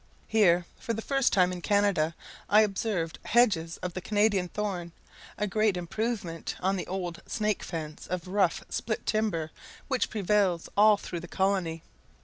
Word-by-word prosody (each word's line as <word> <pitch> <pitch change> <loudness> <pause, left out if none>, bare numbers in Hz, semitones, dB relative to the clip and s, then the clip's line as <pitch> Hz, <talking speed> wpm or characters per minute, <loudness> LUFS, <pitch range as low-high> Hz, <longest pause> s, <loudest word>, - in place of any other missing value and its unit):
Here, 180 -5 +4
for 230 - -3
the 225 - -3
first 270 -2 +2
time 180 -2 +4
in 180 -1 -5
Canada, 195 -5 +2 0.3
I 210 +1 +7
observed 195 -5 -1
hedges 190 -9 +3
of 180 -1 -3
the 185 - -4
Canadian 205 -2 +2
thorn 180 -4 -3 0.4
a 210 - 0
great 210 -1 +1
improvement 180 -1 -3
on 190 +2 +1
the 185 - -4
old 180 -2 -4
snake 215 -2 0
fence 155 -3 -6
of 180 -1 -4
rough 195 0 +1
split 220 -2 -3
timber 200 -8 0 0.4
which 260 -2 +1
prevails 200 -4 +1
all 210 +1 +6
through 175 -3 -6
the 175 - -9
colony. 185 -4 0
195 Hz, 155 wpm, -28 LUFS, 175-210 Hz, 0.4 s, I